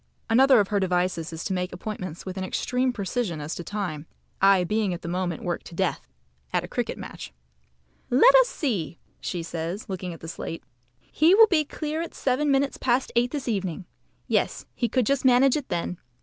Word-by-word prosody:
Another 260 +1 +6
of 200 - +1
her 205 - +1
devices 180 -3 0
is 160 0 -6
to 195 - -2
make 180 0 -2
appointments 185 -4 -6
with 185 -1 -5
an 190 - -3
extreme 250 +6 0
precision 205 -5 -2
as 150 +2 -4
to 175 - -5
time, 170 -7 -4 0.3
I 195 -1 +6
being 205 0 0
at 170 - -11
the - - -5
moment 175 -1 -2
worked 175 -1 -3
to 170 - -11
death 185 - -1 0.4
(at - - +1
a - - -6
cricket - - -3
match). 60 - -8 0.8
"Let 385 - +6
us - - +6
see!" 210 - -2 0.2
says 170 0 -3
she, - - -21
looking 185 -2 -4
at 165 - -9
the 165 - -9
slate. 165 0 -6 0.4
"He 330 +5 +3
will 450 +1 +9
be 345 -7 +2
clear 305 +2 -4
at 335 - -6
seven 275 +3 +1
minutes 275 0 +2
past 255 +1 +1
eight 240 +1 +3
this 280 -1 -5
evening. 190 -5 -2 0.4
Yes, - - 0
he 235 - -1
could 255 +1 +1
just 275 +3 +1
manage 260 +1 +5
it 290 -3 -4
then. 175 0 -2
200 Hz, 200 wpm, -25 LUFS, 175-260 Hz, 0.8 s, will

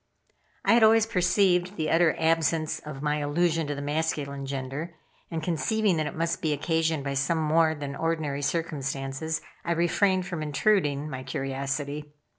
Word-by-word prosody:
I - - +5
had 235 - +5
always 220 0 +6
perceived 180 -2 +2
the 155 -4 -1
utter 165 -1 +4
absence 160 -1 +1
of 150 -2 -8
my 150 0 +1
allusion 160 +2 +1
to 145 - -2
the 140 - -5
masculine 145 -2 -2
gender, 140 +5 -4 0.3
and 160 -2 -4
conceiving 190 +3 +1
that 155 -1 0
it 150 - -6
must 165 +1 -1
be 155 -2 +1
occasioned 160 0 0
by 140 0 -2
some 140 +5 +1
more 160 0 +3
than 140 -1 -5
ordinary 155 -2 -1
circumstances, 145 -1 -2 0.2
I 170 - 0
refrained 185 +2 +2
from 175 -4 -4
intruding 150 -2 +1
my 130 -3 -5
curiosity. 140 +3 -4
155 Hz, 160 wpm, -27 LUFS, 145-170 Hz, 0.3 s, always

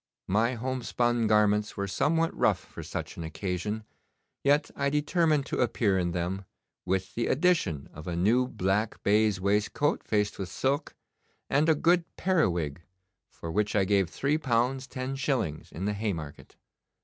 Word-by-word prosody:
My 115 +6 +2
homespun 120 -1 0
garments 105 -1 +2
ware 100 - -1
somewhat 165 - +1
rough - - +3
for - - -11
such - - -6
an 85 - -5
occasion, 95 +6 -3 0.6
yet 145 +2 +3
I 140 0 +1
determined 150 0 +2
to - - -3
appear 105 -5 +2
in 85 -1 0
them, 90 +3 -3 0.4
with 95 0 -1
the 120 - -1
addition 130 - +1
of 80 +2 -10
a 85 - -2
new 115 +9 +3
black 105 -1 -1
baize 105 -1 +3
waistcoat 105 +9 +1
faced 105 -1 0
with 95 -2 -4
silk, 135 - -1 0.6
and 150 +4 +3
a 160 - +5
good 170 +3 +3
periwig, 90 - +1 0.5
for 85 - -7
which 105 +3 0
I 100 -2 +3
gave 95 -3 +2
three 140 - 0
pounds 130 -1 0
ten 130 +1 -4
shillings 125 - -2
in 95 - -5
the 105 - 0
Haymarket. 95 -9 -5
105 Hz, 155 wpm, -28 LUFS, 95-135 Hz, 0.6 s, a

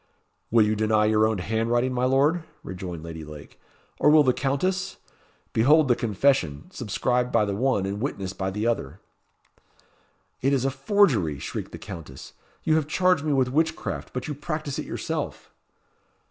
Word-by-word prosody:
"Will 115 -2 +5
you 105 +1 +1
deny 110 0 +2
your 110 0 +4
own 110 -1 -1
handwriting, 115 +6 0
my 125 0 +1
Lord?" 145 +6 +2 0.2
rejoined 90 -3 -6
Lady 80 -1 -7
Lake; 75 -1 -12 0.4
"or - - +5
will 150 0 +7
the 130 -2 +3
Countess? 185 +9 -1 0.6
Behold 150 +6 +5
the 120 - +5
confession, 105 - 0
subscribed 125 +2 -1
by 110 -2 +3
the 100 - -2
one, 120 -3 +1
and 100 +2 -3
witnessed 95 -8 -3
by 95 -1 -2
the 105 +3 -3
other." 95 -8 -2 1.4
"It 135 +2 +2
is 135 -1 +1
a 135 - +1
forgery!" 135 - +2
shrieked - - -6
the - - -7
Countess. 75 -6 -10 0.3
"You 155 0 +3
have 155 -2 -1
charged 180 -1 +2
me 155 - 0
with 130 -2 +2
witchcraft; 160 +2 -1
but 125 0 -4
you 150 - -3
practise 150 -1 -4
it - - -5
yourself." - - -4
120 Hz, 165 wpm, -25 LUFS, 100-140 Hz, 1.4 s, will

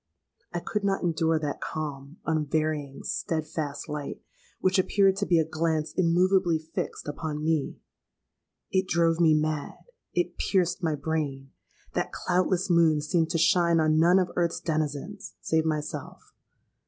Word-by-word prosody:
"I 175 - -2
could 205 +4 -3
not 195 -1 0
endure 160 -1 +2
that 150 -2 -3
calm—unvarying—steadfast 155 0 -3
light, 150 -1 -5 0.4
which 185 0 +2
appeared 195 0 +3
to 200 - -1
be 175 - +4
a 160 - +3
glance 160 -1 -1
immoveably 180 0 +3
fixed 155 -1 -5
upon 150 0 -4
me. 155 -3 0 0.9
It 190 0 +1
drove 165 -1 +2
me 160 -2 +5
mad—it 175 - -3
pierced 185 -2 +1
my 160 -3 0
brain. 140 -3 -3 0.4
That - - -1
cloudless 185 +1 0
moon 165 -4 +4
seemed 160 +2 +1
to - - 0
shine 170 0 +4
on 155 0 +3
none 175 +3 +5
of 185 -2 +1
earth's 170 -1 0
denizens, 155 +5 -3
save 160 0 +1
myself. 155 -1 -4
160 Hz, 130 wpm, -27 LUFS, 155-175 Hz, 0.9 s, me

